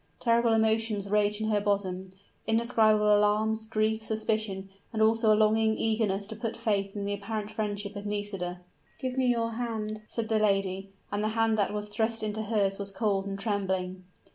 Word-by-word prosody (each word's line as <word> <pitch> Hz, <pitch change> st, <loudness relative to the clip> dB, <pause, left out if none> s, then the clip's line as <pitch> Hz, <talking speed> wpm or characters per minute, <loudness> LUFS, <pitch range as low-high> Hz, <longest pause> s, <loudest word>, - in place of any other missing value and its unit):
Terrible 235 Hz, -1 st, +3 dB
emotions 220 Hz, -2 st, +1 dB
raged 210 Hz, 0 st, +2 dB
in 215 Hz, -, 0 dB
her 210 Hz, -1 st, +2 dB
bosom 190 Hz, -2 st, -1 dB, 0.4 s
indescribable 220 Hz, -2 st, +4 dB
alarms, 215 Hz, +2 st, +2 dB
grief, 220 Hz, 0 st, +1 dB
suspicion, 215 Hz, -3 st, -2 dB, 0.2 s
and 220 Hz, -, -3 dB
also 220 Hz, 0 st, +4 dB
a 210 Hz, -, +5 dB
longing 220 Hz, 0 st, +3 dB
eagerness 215 Hz, -3 st, 0 dB
to 220 Hz, +2 st, -6 dB
put 225 Hz, +1 st, -4 dB
faith 205 Hz, -4 st, -1 dB
in 200 Hz, -1 st, -3 dB
the 200 Hz, -, -1 dB
apparent 210 Hz, +1 st, -4 dB
friendship 205 Hz, -1 st, -3 dB
of 205 Hz, 0 st, -5 dB
Nisida. 195 Hz, -4 st, -3 dB, 0.4 s
"Give 255 Hz, -1 st, -3 dB
me 260 Hz, -1 st, +2 dB
your 230 Hz, -2 st, +1 dB
hand," 215 Hz, -3 st, -3 dB
said 230 Hz, -2 st, -3 dB
the 220 Hz, -1 st, +2 dB
lady; 195 Hz, -2 st, +1 dB, 0.2 s
and 205 Hz, +1 st, -1 dB
the -, -, +2 dB
hand 225 Hz, -1 st, +3 dB
that 200 Hz, -, +2 dB
was 210 Hz, 0 st, -3 dB
thrust 220 Hz, +1 st, -1 dB
into 215 Hz, 0 st, -2 dB
hers 205 Hz, -3 st, 0 dB
was 200 Hz, 0 st, -3 dB
cold 200 Hz, -1 st, 0 dB
and 195 Hz, 0 st, -3 dB
trembling. 190 Hz, -3 st, -2 dB
215 Hz, 180 wpm, -29 LUFS, 200-220 Hz, 0.4 s, a